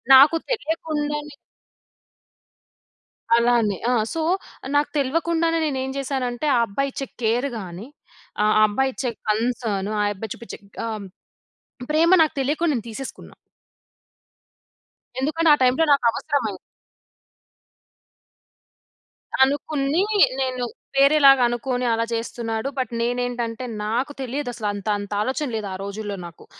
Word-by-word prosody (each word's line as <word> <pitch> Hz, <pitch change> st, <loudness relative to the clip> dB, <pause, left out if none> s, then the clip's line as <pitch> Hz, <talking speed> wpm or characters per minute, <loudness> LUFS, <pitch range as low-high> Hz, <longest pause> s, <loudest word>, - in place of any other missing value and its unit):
నాకు 280 Hz, +5 st, +8 dB
తెలియకుండానే 300 Hz, -7 st, -2 dB, 2.0 s
అలానే. 235 Hz, -4 st, +2 dB
ఆ! -, -, +3 dB, 0.2 s
సో, 330 Hz, -, -2 dB, 0.5 s
నాకు 290 Hz, +1 st, +3 dB
తెల్వకుండానే 330 Hz, +4 st, +1 dB
నేనేం 265 Hz, -3 st, -2 dB
జేశానంటే, 265 Hz, 0 st, -2 dB
ఆ -, -, +3 dB
అబ్బాయిచ్చే 275 Hz, +6 st, -3 dB, 0.2 s
కేర్ 235 Hz, +4 st, +1 dB
గాని, 185 Hz, +3 st, -8 dB, 0.6 s
ఆ -, -, +3 dB
ఆ -, -, +5 dB
అబ్బాయిచ్చే 265 Hz, +3 st, -1 dB, 0.2 s
కన్సర్న్, 215 Hz, -2 st, 0 dB
ఆ -, -, +2 dB
యబ్బాయి 205 Hz, +1 st, -7 dB
చూపిచ్చే 235 Hz, -, -9 dB, 0.3 s
ఆం 215 Hz, -2 st, -4 dB, 0.9 s
ప్రేమ 325 Hz, +3 st, +4 dB
నాకు 315 Hz, -, +3 dB
తెలియకుండా 300 Hz, +5 st, +1 dB
నేను 235 Hz, -5 st, -2 dB
తీసేసుకున్నా. 260 Hz, +4 st, -8 dB, 1.9 s
ఎందుకంటే 315 Hz, +4 st, +1 dB
ఆ -, -, +7 dB
టైంలో 255 Hz, +6 st, +4 dB
నాకవసరమైయి 235 Hz, -4 st, 0 dB, 2.9 s
అనుకుని 285 Hz, +3 st, +1 dB, 0.4 s
నేను, 255 Hz, -1 st, -1 dB, 0.3 s
వేరేలాగనుకుని 265 Hz, -3 st, +4 dB
అలా 230 Hz, 0 st, 0 dB
జేస్తున్నాడు. 230 Hz, +1 st, -3 dB
బట్ 260 Hz, -1 st, -1 dB
నేనేంటంటే, 245 Hz, 0 st, -2 dB, 0.2 s
నాకు 240 Hz, +7 st, -1 dB
తెలియదసల 245 Hz, -4 st, -3 dB
అంతంతాలోచన 205 Hz, +6 st, -2 dB
లేదు, 215 Hz, -2 st, -3 dB
ఆ -, -, -4 dB
రోజుల్లో 200 Hz, +1 st, -5 dB
నాకు. 170 Hz, -2 st, -12 dB
255 Hz, 100 wpm, -23 LUFS, 225-285 Hz, 2.9 s, నాకు